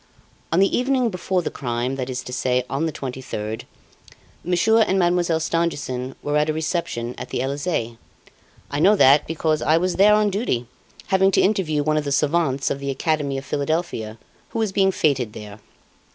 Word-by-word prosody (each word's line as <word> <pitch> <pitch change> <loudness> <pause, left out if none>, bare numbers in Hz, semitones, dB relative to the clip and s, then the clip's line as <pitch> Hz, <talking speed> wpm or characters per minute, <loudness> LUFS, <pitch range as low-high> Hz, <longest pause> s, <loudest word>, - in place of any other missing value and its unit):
On 165 - +2
the 195 0 +3
evening 255 -2 +1
before 180 0 -1
the - - -3
crime, 125 0 -2
that 130 -1 -4
is 130 0 -4
to 125 - -8
say, 125 0 0
on 145 +4 -1
the - - -2
23rd, 125 -6 -5 0.8
Monsieur 180 +6 +3
and 195 -3 +2
Mademoiselle 175 -2 +2
Stangerson 145 -6 -2
were 145 +1 0
at 150 +1 +1
a - - +1
reception 155 -7 -2
at - - -7
the - - -3
Elysee. 135 -3 -2 0.7
I 145 - -1
know 195 +7 +5
that, 140 -5 +5
because 155 -1 0
I 155 - +3
was 180 +1 -1
there 210 +2 +6
on 210 -1 +2
duty, 190 - -1 0.4
having 190 0 +4
to - - +4
interview 175 -8 +1
one 155 +1 +1
of 150 - 0
the 140 - -3
savants 140 -2 +1
of 140 - -2
the 140 0 -4
Academy 140 0 -1
of 135 - -6
Philadelphia, 140 -8 -2 0.3
who - - -6
was 220 -3 0
being 190 0 +3
feted 135 - 0
there. 105 -1 -10
155 Hz, 185 wpm, -22 LUFS, 130-180 Hz, 0.8 s, there